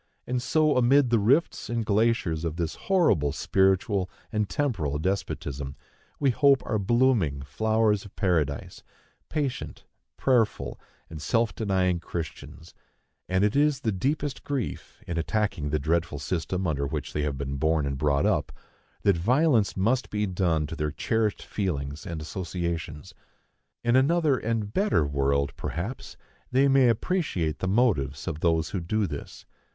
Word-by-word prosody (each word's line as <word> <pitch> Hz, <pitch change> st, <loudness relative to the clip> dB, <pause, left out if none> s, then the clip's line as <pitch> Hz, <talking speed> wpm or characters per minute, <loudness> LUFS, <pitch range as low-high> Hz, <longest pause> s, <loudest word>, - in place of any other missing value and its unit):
And 125 Hz, 0 st, -1 dB
so, 150 Hz, +2 st, +2 dB
amid 125 Hz, +1 st, +4 dB
the 115 Hz, -, +4 dB
rifts 135 Hz, +11 st, +2 dB
and 115 Hz, -2 st, -1 dB
glaciers 105 Hz, -6 st, +1 dB
of 80 Hz, -2 st, -2 dB
this 85 Hz, -2 st, -2 dB
horrible 165 Hz, -, +2 dB
spiritual 95 Hz, +2 st, +1 dB, 0.2 s
and 105 Hz, -3 st, -1 dB
temporal 100 Hz, -, -1 dB
despotism, 70 Hz, -6 st, -3 dB, 0.4 s
we 140 Hz, -2 st, +3 dB
hope 140 Hz, +2 st, +4 dB
are 110 Hz, -, 0 dB
blooming 100 Hz, -, +2 dB
flowers 110 Hz, +4 st, +1 dB
of 100 Hz, -, -14 dB
Paradise, 80 Hz, -8 st, -1 dB, 0.5 s
patient, 145 Hz, -4 st, -3 dB, 0.3 s
prayerful, 120 Hz, -5 st, +1 dB, 0.3 s
and 80 Hz, -2 st, -9 dB
self 115 Hz, +5 st, +1 dB
denying 95 Hz, -4 st, +1 dB
Christians; 80 Hz, 0 st, -7 dB, 0.6 s
and 95 Hz, +1 st, +2 dB
it 105 Hz, +3 st, +2 dB
is 145 Hz, -1 st, +3 dB
the 110 Hz, -, 0 dB
deepest 140 Hz, +8 st, -2 dB
grief, 140 Hz, -6 st, -4 dB
in 85 Hz, -1 st, -2 dB
attacking 90 Hz, -5 st, -1 dB
the 75 Hz, -, +1 dB
dreadful 80 Hz, +2 st, 0 dB
system 90 Hz, +5 st, -2 dB
under 70 Hz, -4 st, 0 dB
which 75 Hz, 0 st, -4 dB
they 75 Hz, -, -1 dB
have 75 Hz, -2 st, -2 dB
been 70 Hz, 0 st, -3 dB
born 80 Hz, +1 st, +1 dB
and 70 Hz, -1 st, -2 dB
brought 70 Hz, -1 st, +2 dB
up, -, -, +1 dB, 0.5 s
that 100 Hz, -3 st, +4 dB
violence 120 Hz, -, +2 dB
must 120 Hz, +7 st, +1 dB
be 105 Hz, 0 st, -1 dB
done 90 Hz, -5 st, 0 dB
to 80 Hz, -, -6 dB
their 75 Hz, -1 st, -1 dB
cherished 110 Hz, +6 st, -1 dB
feelings 75 Hz, -7 st, -3 dB
and 80 Hz, -2 st, -5 dB
associations. 85 Hz, -3 st, -4 dB, 0.7 s
In 120 Hz, +1 st, +3 dB
another 150 Hz, +2 st, +3 dB
and 110 Hz, -3 st, -2 dB
better 195 Hz, -, +2 dB
world, 70 Hz, 0 st, 0 dB
perhaps, 100 Hz, +10 st, -5 dB, 0.3 s
they 135 Hz, +2 st, +4 dB
may 135 Hz, -2 st, +5 dB
appreciate 105 Hz, -, -1 dB
the 95 Hz, -, -2 dB
motives 95 Hz, -, +1 dB
of 80 Hz, -4 st, -3 dB
those 80 Hz, -2 st, +1 dB
who 95 Hz, -, -1 dB
do 105 Hz, +5 st, 0 dB
this. 75 Hz, -5 st, -7 dB
95 Hz, 150 wpm, -27 LUFS, 80-120 Hz, 0.7 s, may